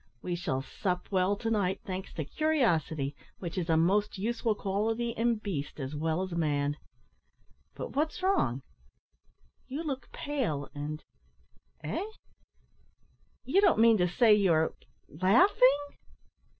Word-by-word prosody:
We 180 - -2
shall 155 -7 -2
sup 180 +6 -3
well 190 +1 +2
to 225 +2 -3
night, 195 -4 0
thanks 190 -2 -5
to 155 - -4
curiosity, 165 - 0 0.2
which 175 -3 -6
is 180 -2 -2
a 160 - +4
most 200 +6 +2
useful 225 +2 0
quality 220 +4 -1
in 230 +1 +1
beast 185 -10 -5
as 135 +1 -4
well 160 +4 -1
as 185 - -6
man. 145 -3 0 1.0
But - - -6
what's 310 +5 -1
wrong; 135 - +1 1.0
you 285 +5 -4
look 275 -4 -5
pale, 225 - -3
and, 150 +1 -5 0.8
eh? - - -2 1.4
you 320 +11 +3
don't 390 -3 +4
mean 225 -1 +6
to 180 - +3
say 220 +5 +5
you're 170 -6 +3 0.3
laughing?" 255 - +4
190 Hz, 130 wpm, -30 LUFS, 160-235 Hz, 1.4 s, mean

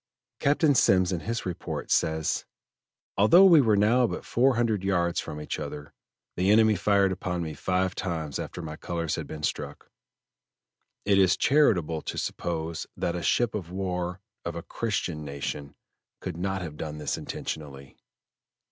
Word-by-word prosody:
Captain 145 +1 +3
Semmes 95 -6 +4
in 90 - -1
his 115 +6 -4
report 90 -2 -5
says: 80 0 +1 0.7
"Although 165 - +7
we 170 -6 +8
were 110 -5 +3
now 115 +5 +4
but - - -5
four 130 +2 +3
hundred 110 -4 +1
yards 90 -3 +1
from 75 - -6
each 75 - -4
other, 75 0 -7 0.4
the 90 +2 +1
enemy 110 0 +5
fired 100 0 +3
upon 90 -1 -3
me 80 -1 -5
five 95 +4 0
times 80 -5 -3
after 90 - -6
my 80 -1 -6
colors 85 -1 -3
had - - -3
been 75 -1 -8
struck. - - -4 1.1
It 100 -1 +4
is 95 -2 +4
charitable 90 - +3
to - - -5
suppose 85 -1 -3
that 85 - -1
a 90 - -3
ship 120 +5 +1
of 95 -6 -4
war 90 -1 -3 0.2
of 85 0 -4
a 85 - -5
christian 90 -8 -3
nation 70 0 -5 0.4
could - - -5
not 95 +2 -2
have 75 -3 -7
done 75 -1 -5
this 75 - -2
intentionally." 70 -3 -6
90 Hz, 160 wpm, -27 LUFS, 80-105 Hz, 1.1 s, we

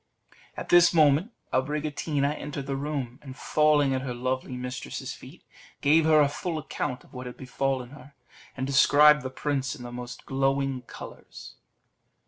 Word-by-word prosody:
At - - -6
this 175 0 +6
moment 155 - +4 0.2
Abricotina 145 +1 -1
entered 145 -2 -6
the 135 0 -3
room, 135 -3 -4
and 135 -2 -10
falling 150 -3 +3
at 130 - -1
her 130 -2 -4
lovely 130 +1 -3
mistress's 125 +1 -5
feet, - - -14 0.4
gave 155 +3 +4
her 155 -1 +6
a 145 - +4
full 160 +3 -4
account 145 -3 -4
of - - -22
what 125 -1 -7
had 125 - -9
befallen 130 -1 -2
her, 145 -1 -14 0.4
and 130 - -2
described 150 +2 +6
the 130 - -4
prince 135 0 -2
in 125 - -10
the 120 - -7
most 120 0 -8
glowing 135 -1 0
colours. - - -11
140 Hz, 160 wpm, -27 LUFS, 130-150 Hz, 0.4 s, this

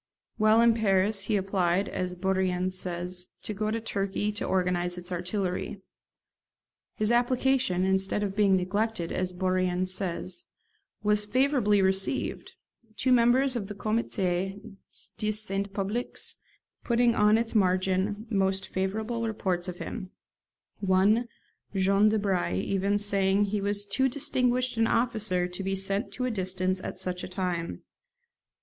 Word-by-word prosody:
While 215 +1 +5
in 235 0 +6
Paris 200 -2 +1
he 215 - +1
applied, 190 -1 +1
as 180 0 -3
Bourrienne 185 0 0
says, 180 0 -4 0.2
to 215 - -4
go 215 +1 -2
to 225 +1 -1
Turkey 205 -1 -2
to 210 - -4
organise 180 -1 0
its 180 +1 -7
artillery. 180 +2 -2 1.2
His 215 +1 +1
application, 245 -4 +2
instead 190 +2 +1
of 195 -1 -3
being 200 -2 +4
neglected, 200 0 -1
as 185 0 -1
Bourrienne 185 0 0
says, 185 - -3 0.6
was 210 0 +2
favourably 230 -3 +2
received, 190 +7 0 0.4
two 260 - +1
members 250 +2 +4
of 210 -5 -3
the 205 - -7
'Comité 200 -1 -2 0.5
de 215 0 0
Saint 200 -2 -2
Public' 205 +5 -3 0.7
putting 235 0 +3
on 210 0 +4
its 230 0 -2
margin 190 +1 +1
most 190 -2 0
favorable 220 +5 -2
reports 185 -4 -2
of 180 -1 -5
him; 185 - -6 0.7
one, 200 +4 +3 0.5
Jean 195 +2 +4
Debry, 195 - 0
even 200 +1 +1
saying 200 -1 +2
that 205 - -1
he 210 -1 0
was 205 0 0
too 265 +6 +1
distinguished 255 -2 0
an 225 0 +3
officer 215 -7 +1
to 180 +2 -6
be 195 0 -1
sent 195 +4 0
to 255 - -2
a 250 - 0
distance 185 -2 -1
at - - -5
such 180 -1 -3
a - - -4
time. 180 - -3
195 Hz, 140 wpm, -28 LUFS, 185-220 Hz, 1.2 s, in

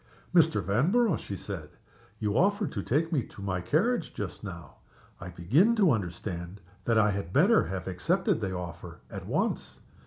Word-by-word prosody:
"Mr. 160 - +4
Vanborough," 165 - +3
she 100 - -6
said, - - -6 0.5
"you 105 -1 -1
offered 200 - +2
to 100 - -3
take 155 - 0
me 145 - +3
to 110 - -12
my 95 -2 -2
carriage 200 - 0
just 105 0 -5
now. 85 -9 -8 0.4
I 90 - -7
begin 130 - +3
to 200 -7 +4
understand 90 -2 -3 0.3
that 115 -1 +2
I 105 -1 +4
had 100 -4 -4
better 195 - +5
have 95 -1 -5
accepted 95 +4 0
the 95 -3 -2
offer 90 -1 -8
at - - -7
once. - - -1
105 Hz, 165 wpm, -29 LUFS, -, 0.5 s, better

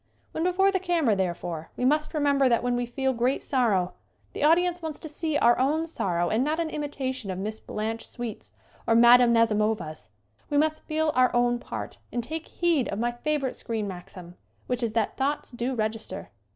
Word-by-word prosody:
When 320 - -2
before 375 +2 +3
the 380 - +1
camera, 335 - +2
therefore, 175 -3 -3
we 250 - 0
must 300 +4 +1
remember 280 -3 +3
that 235 0 +2
when 245 0 +1
we 245 0 -1
feel 265 +2 -1
great 245 +3 0
sorrow 210 -10 +1 0.4
the - - -3
audience 350 +3 +3
wants 315 -2 -4
to - - -8
see 310 0 -2
our 240 -3 +4
own 300 +5 +2
sorrow 175 - -1
and 225 +4 +2
not 310 +3 0
an 325 -2 -1
imitation 265 -6 -4
of 185 - -3
Miss 215 +3 -4
Blanche 225 +2 -4
Sweet's 240 -4 -7 0.4
or 230 - +4
Mme. 240 +1 +7
Nazimova's. 215 -8 +1 0.4
We 290 - +1
must 310 +1 +1
feel 315 0 +1
our 255 0 +4
own 240 0 +2
part - - -7
and 240 - -2
take 315 +6 -5
heed 335 -7 +1
of 200 - -3
my 240 +2 0
favorite 275 +2 -2
screen 220 -3 -3
maxim, 180 -1 -9 0.3
which 250 0 -2
is 230 -2 -1
that 225 -2 0
thoughts 280 +2 -1
do 245 +2 -2
register. 220 0 -4
245 Hz, 190 wpm, -26 LUFS, 220-300 Hz, 0.4 s, Mme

